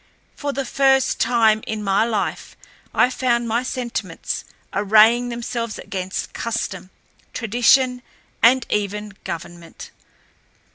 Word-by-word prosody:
For 290 Hz, -1 st, -3 dB
the 275 Hz, -1 st, -3 dB
first 270 Hz, 0 st, +2 dB
time 225 Hz, -2 st, +3 dB
in 215 Hz, -1 st, -3 dB
my 195 Hz, +1 st, +2 dB
life 220 Hz, -3 st, -3 dB, 0.3 s
I 250 Hz, -, +3 dB
found 240 Hz, -2 st, 0 dB
my 230 Hz, +2 st, +1 dB
sentiments 250 Hz, -2 st, -4 dB, 0.3 s
arraying 220 Hz, +4 st, +4 dB
themselves 235 Hz, -1 st, -4 dB
against 185 Hz, -1 st, -5 dB
custom, 205 Hz, -5 st, -4 dB, 0.4 s
tradition, 245 Hz, +2 st, +3 dB, 0.4 s
and 250 Hz, +2 st, +5 dB
even 210 Hz, 0 st, -2 dB
government. 170 Hz, 0 st, -8 dB
230 Hz, 105 wpm, -21 LUFS, 210-245 Hz, 0.4 s, and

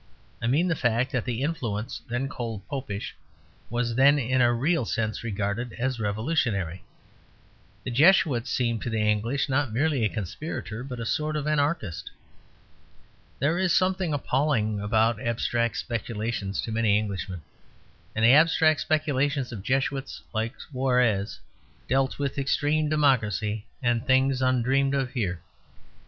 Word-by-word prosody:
I 115 Hz, -, -1 dB
mean 150 Hz, +9 st, +2 dB
the 170 Hz, -, +2 dB
fact 120 Hz, -1 st, +1 dB
that 130 Hz, -3 st, -1 dB
the 125 Hz, +1 st, -2 dB
influence 115 Hz, -9 st, -3 dB
then 125 Hz, +3 st, -1 dB
called 115 Hz, -6 st, -6 dB
Popish 130 Hz, -8 st, -5 dB, 0.5 s
was 120 Hz, 0 st, -1 dB
then 140 Hz, +4 st, +5 dB
in 130 Hz, -1 st, +1 dB
a 120 Hz, 0 st, +5 dB
real 140 Hz, +6 st, +1 dB
sense 110 Hz, -1 st, -2 dB
regarded 105 Hz, +2 st, -2 dB
as 130 Hz, 0 st, -2 dB
revolutionary. 105 Hz, -, -1 dB, 1.0 s
The -, -, -4 dB
Jesuit 140 Hz, -3 st, +4 dB
seemed 120 Hz, -2 st, 0 dB
to -, -, -3 dB
the 115 Hz, -, -2 dB
English 110 Hz, +6 st, +1 dB
not 135 Hz, -2 st, 0 dB
merely 140 Hz, +1 st, +1 dB
a 105 Hz, -, +2 dB
conspirator 110 Hz, -, -5 dB
but 125 Hz, -2 st, -7 dB
a 115 Hz, -, -4 dB
sort 155 Hz, +6 st, -1 dB
of 150 Hz, -1 st, -2 dB
anarchist. 145 Hz, -, -1 dB, 1.3 s
There 155 Hz, +6 st, +1 dB
is 185 Hz, -3 st, +2 dB
something 185 Hz, -2 st, +1 dB
appalling 130 Hz, -7 st, 0 dB
about 110 Hz, +2 st, +2 dB
abstract 115 Hz, -1 st, 0 dB
speculations 110 Hz, -3 st, -3 dB
to 115 Hz, -, -4 dB
many 110 Hz, -2 st, +3 dB
Englishmen; 95 Hz, -5 st, -4 dB, 0.7 s
and 110 Hz, +1 st, +2 dB
the 120 Hz, -, +8 dB
abstract 155 Hz, 0 st, +5 dB
speculations 145 Hz, -3 st, 0 dB
of 110 Hz, -5 st, -6 dB
Jesuits 135 Hz, +4 st, -2 dB
like 110 Hz, +1 st, -2 dB
Suarez 125 Hz, -6 st, 0 dB, 0.5 s
dealt 135 Hz, 0 st, +1 dB
with 140 Hz, 0 st, -2 dB
extreme 150 Hz, +3 st, +1 dB
democracy 110 Hz, -8 st, +1 dB, 0.2 s
and 120 Hz, -1 st, +1 dB
things 130 Hz, 0 st, +2 dB
undreamed 130 Hz, +2 st, +2 dB
of 135 Hz, -3 st, -1 dB
here. 95 Hz, -9 st, -2 dB
125 Hz, 140 wpm, -26 LUFS, 110-140 Hz, 1.3 s, the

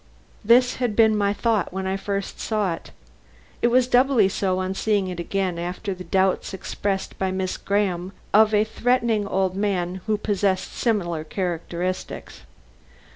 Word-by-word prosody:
This 245 Hz, +3 st, +4 dB
had 245 Hz, -5 st, -1 dB
been 220 Hz, -1 st, +5 dB
my 200 Hz, -1 st, +2 dB
thought 215 Hz, -2 st, 0 dB
when 190 Hz, +1 st, -4 dB
I 190 Hz, 0 st, 0 dB
first 195 Hz, 0 st, -4 dB
saw 210 Hz, -5 st, 0 dB
it. -, -, -9 dB, 0.7 s
It -, -, +4 dB
was 250 Hz, +1 st, +4 dB
doubly 250 Hz, -4 st, +4 dB
so 185 Hz, -1 st, 0 dB
on 185 Hz, 0 st, -2 dB
seeing 205 Hz, -1 st, 0 dB
it 180 Hz, -1 st, -5 dB
again 185 Hz, 0 st, -1 dB
after 180 Hz, +4 st, -3 dB
the 180 Hz, 0 st, -9 dB
doubts 190 Hz, +2 st, +1 dB
expressed 195 Hz, +1 st, -3 dB
by 190 Hz, -, 0 dB
Miss 185 Hz, 0 st, -2 dB
Graham 190 Hz, -3 st, -1 dB, 0.2 s
of 215 Hz, +1 st, +6 dB
a 210 Hz, 0 st, +4 dB
threatening 230 Hz, -2 st, +1 dB
old 190 Hz, -1 st, 0 dB
man 190 Hz, -2 st, -1 dB
who 215 Hz, -1 st, +2 dB
possessed 200 Hz, -2 st, 0 dB
similar 175 Hz, -9 st, -1 dB
characteristics. 175 Hz, +1 st, -4 dB
195 Hz, 155 wpm, -23 LUFS, 185-215 Hz, 0.7 s, of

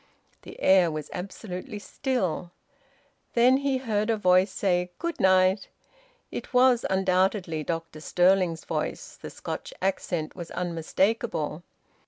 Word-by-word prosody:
The -, -, -12 dB
air 190 Hz, -3 st, +5 dB
was 155 Hz, -2 st, -5 dB
absolutely 185 Hz, +1 st, -6 dB
still. 200 Hz, -, -2 dB, 0.9 s
Then 250 Hz, +2 st, +5 dB
he 275 Hz, -1 st, 0 dB
heard 215 Hz, -4 st, -1 dB
a 225 Hz, -, +2 dB
voice 185 Hz, -1 st, +4 dB
say, 180 Hz, -2 st, 0 dB
"Good 340 Hz, 0 st, -4 dB
night." 185 Hz, +1 st, +4 dB, 0.6 s
It -, -, -7 dB
was 250 Hz, -1 st, +5 dB
undoubtedly 185 Hz, -3 st, +1 dB
Dr 165 Hz, -1 st, -4 dB
Stirling's 180 Hz, -1 st, +2 dB
voice. -, -, -4 dB
The -, -, -6 dB
Scotch -, -, -6 dB
accent 175 Hz, -4 st, -2 dB
was 175 Hz, -3 st, -7 dB
unmistakable. 175 Hz, 0 st, -1 dB
185 Hz, 120 wpm, -27 LUFS, 175-215 Hz, 0.9 s, air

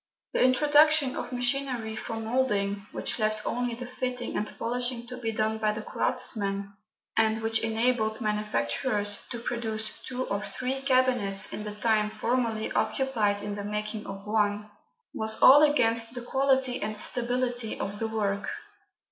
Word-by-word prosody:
The -, -, +1 dB
introduction 290 Hz, +1 st, +4 dB
of 245 Hz, -, -5 dB
machinery 245 Hz, -3 st, -1 dB
for 225 Hz, -, -5 dB
moulding, 210 Hz, -4 st, -1 dB
which -, -, -2 dB
left 215 Hz, 0 st, 0 dB
only 245 Hz, -1 st, -1 dB
the 250 Hz, +1 st, -7 dB
fitting 250 Hz, 0 st, -4 dB
and 210 Hz, -, -2 dB
polishing 245 Hz, 0 st, -1 dB
to 250 Hz, +1 st, -7 dB
be 230 Hz, -2 st, -2 dB
done 220 Hz, 0 st, -1 dB
by 215 Hz, -1 st, +1 dB
the 215 Hz, 0 st, -5 dB
craftsman, 200 Hz, -6 st, +1 dB, 0.4 s
and 220 Hz, 0 st, +2 dB
which 225 Hz, 0 st, +2 dB
enabled 225 Hz, -1 st, +1 dB
manufacturers 210 Hz, -, -1 dB
to 240 Hz, -, -4 dB
produce 220 Hz, -2 st, -3 dB, 0.2 s
two 255 Hz, 0 st, -3 dB
or 200 Hz, +1 st, -2 dB
three 255 Hz, +6 st, -3 dB
cabinets 255 Hz, -7 st, +2 dB
in 210 Hz, -, -4 dB
the 210 Hz, 0 st, -6 dB
time 215 Hz, -1 st, +1 dB
formerly 225 Hz, 0 st, -1 dB
occupied 215 Hz, -7 st, 0 dB
in 205 Hz, 0 st, -4 dB
the 205 Hz, 0 st, -5 dB
making 210 Hz, +1 st, -4 dB
of 195 Hz, 0 st, -8 dB
one, 210 Hz, -1 st, 0 dB, 0.4 s
was 220 Hz, 0 st, 0 dB
all 285 Hz, +3 st, +9 dB
against 230 Hz, -6 st, +3 dB
the 245 Hz, -, -4 dB
quality 265 Hz, -1 st, +1 dB
and 215 Hz, +1 st, -3 dB
stability 245 Hz, 0 st, -1 dB
of 200 Hz, +1 st, -4 dB
the 225 Hz, -, -1 dB
work. 205 Hz, -2 st, -1 dB
225 Hz, 155 wpm, -28 LUFS, 210-250 Hz, 0.4 s, all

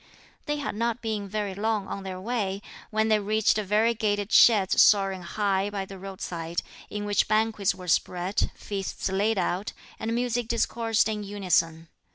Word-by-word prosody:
They 295 Hz, -, 0 dB
had 290 Hz, -, -3 dB
not 235 Hz, +2 st, -2 dB
been 210 Hz, -3 st, -3 dB
very 205 Hz, -1 st, -2 dB
long 210 Hz, 0 st, -1 dB
on 200 Hz, -, -5 dB
their 190 Hz, -1 st, -6 dB
way, 205 Hz, -2 st, -2 dB, 0.3 s
when 220 Hz, 0 st, +1 dB
they 215 Hz, -1 st, +4 dB
reached 215 Hz, +1 st, +2 dB
variegated 210 Hz, 0 st, +1 dB
sheds 205 Hz, -5 st, +6 dB
soaring 195 Hz, -2 st, +4 dB
high 195 Hz, +2 st, 0 dB
by 200 Hz, -2 st, -4 dB
the 195 Hz, 0 st, -10 dB
roadside, 175 Hz, -3 st, -4 dB, 0.3 s
in 205 Hz, 0 st, -4 dB
which 205 Hz, -1 st, +2 dB
banquets 215 Hz, -2 st, +1 dB
were 180 Hz, -1 st, -10 dB
spread, 180 Hz, +3 st, 0 dB
feasts 195 Hz, -1 st, -4 dB
laid 205 Hz, +3 st, +1 dB
out, 185 Hz, +2 st, -1 dB, 0.3 s
and 225 Hz, +1 st, -2 dB
music 245 Hz, -1 st, -1 dB
discoursed 230 Hz, -1 st, +1 dB
in 210 Hz, -1 st, -3 dB
unison. 175 Hz, -5 st, 0 dB
205 Hz, 160 wpm, -27 LUFS, 190-220 Hz, 0.3 s, sheds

